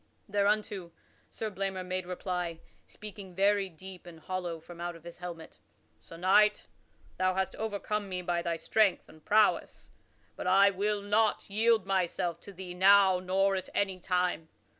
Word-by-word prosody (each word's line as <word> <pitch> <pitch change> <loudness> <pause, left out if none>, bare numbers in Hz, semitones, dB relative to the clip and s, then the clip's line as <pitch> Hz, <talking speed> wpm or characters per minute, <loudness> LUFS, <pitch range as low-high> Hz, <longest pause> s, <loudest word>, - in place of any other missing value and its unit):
Thereunto 205 -3 0 0.4
Sir 220 -1 -5
Blamor 190 -1 -3
made 185 0 -3
reply, 180 -2 -3 0.3
speaking 200 -3 -9
very 200 0 +2
deep 185 +2 -10
and 165 -2 -11
hollow 175 -1 -4
from 170 +1 -12
out 175 0 -4
of 165 - -14
his 170 +1 -10
helmet: 170 -3 -8 0.4
"Sir 165 - -13
Knight, 205 +4 +4 0.5
thou 185 0 +2
hast 190 -1 -1
overcome 210 -1 -3
me 180 -1 -3
by 175 -1 0
thy 170 -1 -1
strength 200 +4 +1
and 155 -1 -17
prowess, 215 0 +2 0.4
but - - -5
I 195 +2 +6
will 205 +1 -1
not 210 0 +1
yield 225 +1 +3
myself 180 -3 -1
to 200 - -11
thee 185 -1 -8
now 190 0 +6
nor 195 +2 +1
at 190 - -4
any 195 -2 0
time. 180 -3 -1
190 Hz, 160 wpm, -30 LUFS, 175-200 Hz, 0.5 s, I